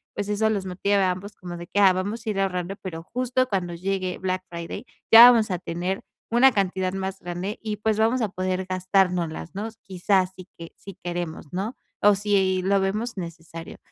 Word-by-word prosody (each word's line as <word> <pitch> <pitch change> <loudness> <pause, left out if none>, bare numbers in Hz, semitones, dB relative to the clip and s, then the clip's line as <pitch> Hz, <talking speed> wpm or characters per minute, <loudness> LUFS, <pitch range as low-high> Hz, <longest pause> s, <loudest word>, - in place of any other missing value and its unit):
pues 205 - -3
eso 215 +1 +2
los 200 -3 -1
motive 190 +2 0
a 190 -2 +3
ambos 200 +3 -7
como 175 -1 -8
de 175 0 -8
que: 205 - -1
"Ah, 195 -2 +7
vamos 205 +5 -3
a - - -2
ir 195 - -2
ahorrando, 190 -1 -1
pero 165 -4 -6
justo 255 +5 0
cuando 180 -4 -1
llegue 185 +1 -2
Black 185 0 -2
Friday 170 -1 -6 0.3
ya 235 +2 +12
vamos 225 -3 +2
a 180 - -1
tener 180 +4 -3 0.3
una 250 +3 +6
cantidad 190 -3 0
más 190 0 -4
grande 175 +4 -5
y, 215 -1 -3
pues, 215 0 0
vamos 230 +3 +2
a 220 - 0
poder 185 0 -2
gastárnoslas, 180 -3 0
¿no?, 210 +3 -3
quizás 190 0 +1
si 185 0 -11
que 165 0 -9
si 195 -2 -11
queremos, 175 -3 -4
¿no?, 200 +7 -3 0.3
o 205 0 +6
si 195 -2 +1
lo 195 +1 +3
vemos 210 +4 -2
necesario". 165 -2 -8
190 Hz, 200 wpm, -24 LUFS, 180-205 Hz, 0.3 s, ya